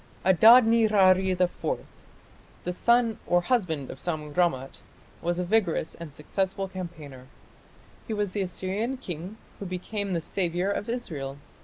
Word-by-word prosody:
Adad 220 +6 +8
nirari 200 -5 +4
IV, 185 - -1 0.8
the 180 - -2
son 235 +3 +2
or 175 - +4
husband 175 - -1
of - - -10
Sammu 155 -4 -4
rammat, 150 -7 0 0.4
was 175 +1 -1
a 180 - 0
vigorous 185 -4 0
and 170 -3 -9
successful 190 +5 -2
campaigner. 160 -9 -9 0.8
He 225 - -2
was 205 -2 -1
the 205 - -1
Assyrian 195 +7 -2
king 185 - -7 0.2
who 200 - -5
became 195 +2 -4
the 170 - +1
"saviour" 180 +2 -1
of 205 - -3
Israel. 150 - -4
185 Hz, 140 wpm, -27 LUFS, 170-210 Hz, 0.8 s, Adad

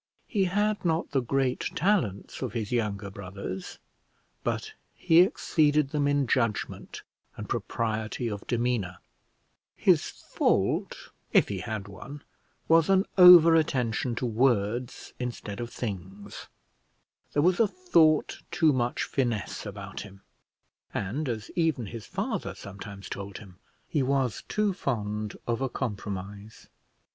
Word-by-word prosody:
He 200 -5 +1
had 205 +3 0
not 165 -1 0
the 135 -2 +2
great 130 +1 0 0.2
talents 160 - 0
of 125 -5 -3
his 110 -3 -3
younger 105 -4 -1
brothers, 95 -1 -7 0.7
but - - -2 0.2
he 165 0 +4
exceeded 150 - +2
them 145 -2 +1
in 145 -1 +2
judgment 115 -4 -1 0.3
and - - -6
propriety 110 +1 -2
of 105 -3 -5
demeanour; 120 -7 -1 0.8
his - - +3
fault, - - -1 0.2
if - - +5
he - - -3
had 105 -2 -4
one, 135 +9 -10 0.4
was 165 +1 +5
an 195 +1 +4
over 180 -3 +10
attention 125 -6 +1
to 125 - -2
words 120 0 0
instead 120 -4 -5
of 120 -1 -4
things; 100 -3 -6 0.9
there 145 - +2
was 180 +1 +3
a 225 - +5
thought 170 - +2
too 160 -4 +3
much 120 -1 0
finesse 120 -5 -2
about 100 -1 -7
him, 100 -2 -10 0.7
and, 125 +9 -2
as 110 -3 -4
even 160 -8 +1
his 115 +1 -8
father - - -3
sometimes 100 0 -9
told 100 0 -6
him, 95 -3 -14 0.3
he 150 - 0
was 130 -3 0
too 210 -2 +1
fond 105 - -3
of 120 +1 -1
a 135 - 0
compromise. 105 -3 -6
120 Hz, 130 wpm, -28 LUFS, 105-150 Hz, 0.9 s, over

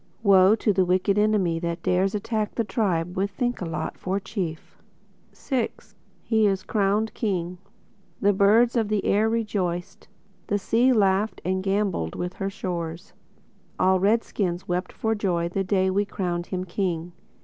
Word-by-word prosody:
Woe 195 0 +6
to 215 -2 +1
the 190 0 +3
wicked 185 +3 +2
enemy 200 -6 +2
That 170 0 -4
dares 190 +3 +1
attack 215 0 -2
The 230 - +1
tribe 180 -6 -1
with 195 +2 0
Thinkalot 190 - -3
for 190 +2 -1
Chief! 185 -6 -5 0.6
VI 255 -4 -1 0.5
(He 220 -2 +3
Is 195 -1 0
Crowned 210 +1 0
King) 180 -5 -2 0.6
The 205 +1 +3
birds 215 +5 +4
of 225 -3 +2
the 210 -1 -1
air 215 +2 +3
rejoiced; 195 -6 -2 0.4
The 205 - +1
Sea 235 +5 +2
laughed 205 -2 +2
and 185 +1 0
gambolled 195 - -1
with 180 +1 -4
her 195 - 0
shores; 170 -4 -5 0.7
All 185 0 +4
Red 215 +5 +3
skins 180 -3 -3
wept 180 +1 -2
for 220 0 -1
joy 175 -5 -1
The 195 +2 -1
day 190 0 +1
we 200 +2 +1
crowned 175 -4 -3
him 185 -1 -3
King. 175 -2 -3
195 Hz, 155 wpm, -25 LUFS, 180-210 Hz, 0.7 s, Woe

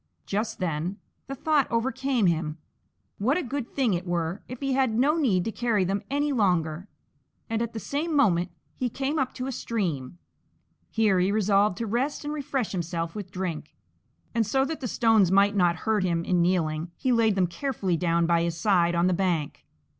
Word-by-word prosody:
Just 215 +3 -2
then 175 +2 -2 0.3
the 275 - -5
thought 295 0 +1
overcame 260 0 0
him, 160 -3 0 0.6
what 255 - +2
a 365 - -1
good 265 -1 -4
thing 255 -7 +2
it 175 +1 -3
were 175 +2 -2
if 250 0 -7
he 275 -1 -1
had 260 -4 +2
no 285 +5 +3
need 220 - +2
to 225 - -1
carry 225 -4 +1
them 195 +2 -1
any 290 +2 0
longer, 180 -6 +1 0.6
and 225 0 -1
at 235 -1 -3
the 225 - -4
same 305 +7 -2
moment 180 -10 +3 0.3
he 250 - -1
came 280 +5 -2
up 265 -2 0
to 255 - -4
a 270 - -3
stream. 175 - -3 0.7
Here 210 -5 +2
he 185 +2 +2
resolved 205 -2 +2
to 230 - -2
rest 255 +8 -1
and 295 - -2
refresh 275 -5 -2
himself 170 -2 -3
with 205 -3 -6
drink, 180 -5 -5 0.6
and 230 -1 +2
so 265 +5 +1
that 315 +2 -4
the 260 - -3
stones 225 -5 +3
might 200 +1 +4
not 175 -3 +3
hurt 220 -3 +2
him 170 -2 0
in 180 -2 +2
kneeling 170 -2 0
he 260 - 0
laid 225 -3 +3
them 190 -2 +3
carefully 195 - -2
down 170 0 +1
by 170 0 +3
his 170 -1 -1
side 175 -2 +2
on 170 +1 +2
the 185 - +3
bank. 170 -5 -1
205 Hz, 195 wpm, -26 LUFS, 175-255 Hz, 0.7 s, might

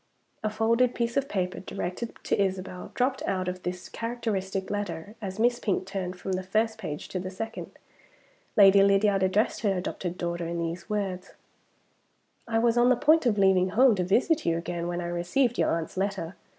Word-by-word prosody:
A 215 - +1
folded 230 +3 +2
piece 235 0 -1
of 275 0 0
paper, 180 -2 -2
directed 190 +5 -5
to - - +1
Isabel, 185 -1 -3
dropped 260 +1 0
out 185 -2 -1
of 180 0 -4
this 180 0 -5
characteristic 205 -5 -3
letter 200 -2 -4
as 190 -2 -5
Miss 240 +2 +2
Pink 195 -5 -1
turned 190 -2 -4
from 190 - -4
the 185 0 0
first 220 +4 0
page 155 -7 -5
to 185 - -3
the 185 +1 -4
second. 225 +4 -7 0.8
Lady 200 -1 +8
Lydiard 200 0 +4
addressed 190 +3 +1
her 200 -4 +1
adopted 180 0 -4
daughter 170 -1 -3
in 170 0 -3
these 170 +1 -4
words: 195 -3 -3 1.1
"I 225 -1 0
was 235 +1 +3
on 240 +1 +5
the 255 - +5
point 305 +2 +4
of 215 -3 +2
leaving 190 -2 +4
home 250 +5 +5
to 185 -3 0
visit 265 - +2
you 165 -1 +1
again, 170 0 -3
when 175 0 -2
I - - -4
received 175 +9 0
your - - +3
aunt's 165 -1 -2
letter. 190 -3 -2
195 Hz, 190 wpm, -27 LUFS, 180-225 Hz, 1.1 s, Lady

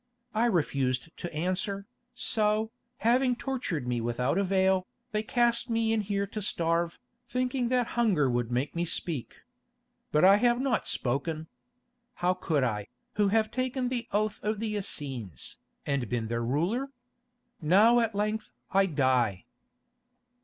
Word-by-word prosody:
I 220 +2 +2
refused 140 - 0
to 175 - -5
answer, 185 +5 -2 0.3
so, 215 -2 +1 0.3
having 250 +2 +4
tortured 240 - -3
me 120 -1 0
without 125 +8 0
avail, 190 -1 +2 0.2
they 215 -1 0
cast 235 +1 +1
me 225 -1 +2
in 220 - +2
here 200 0 -1
to 210 +2 -5
starve, 170 -3 0 0.3
thinking 250 0 0
that 250 -1 +2
hunger 205 - +3
would 120 -1 0
make 125 +6 -1
me 170 - 0
speak. 165 -5 -3 0.7
But 150 +4 +4
I 195 +2 +8
have 240 +2 +3
not 260 -4 0
spoken. 155 +5 -1 0.7
How 180 -2 +2
could 160 -6 0
I, 105 -4 -1 0.3
who 205 -1 +4
have 215 +2 +2
taken 255 0 -1
the 245 -2 -3
oath 210 +1 0
of 215 0 -1
the 215 -1 -2
Essenes, 130 - -4 0.3
and 140 -6 -1
been 115 -2 -2
their 115 0 -1
ruler? 175 - 0 0.7
Now 205 +9 +6
at 225 -3 0
length 215 +2 -1 0.2
I 195 0 +4
die." 130 - +1
195 Hz, 145 wpm, -29 LUFS, 140-225 Hz, 0.7 s, I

